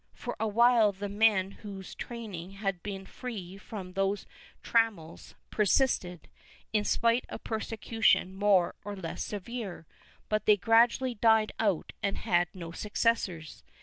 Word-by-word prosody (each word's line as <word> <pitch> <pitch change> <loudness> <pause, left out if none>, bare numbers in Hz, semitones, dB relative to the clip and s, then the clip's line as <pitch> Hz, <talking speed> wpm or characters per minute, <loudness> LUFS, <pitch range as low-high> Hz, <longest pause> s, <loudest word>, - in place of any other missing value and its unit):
For - - -5
awhile 225 0 +4
the 200 +1 -5
men 200 -2 +3
whose 195 -2 -9
training 200 -7 -7
had 195 -3 -3
been 195 -1 -6
free 200 -7 -7
from 195 -3 -8
these 195 +1 0 0.4
trammels 220 -9 0 0.2
persisted, 200 - +1 0.5
in 210 -1 +2
spite 230 +3 +2
of - - -7
persecution 220 -3 +1
more 195 -2 +3
or 205 +1 -5
less 170 -4 -5
severe, 210 -3 -6 0.4
but 215 -1 -1
they 210 -1 +7
gradually 235 +5 +3
died 220 -1 +3
out 200 -7 0
and 200 - -1
had 175 0 +2
no 170 -2 -7
successors. 200 -5 -1
205 Hz, 130 wpm, -30 LUFS, 190-225 Hz, 0.5 s, they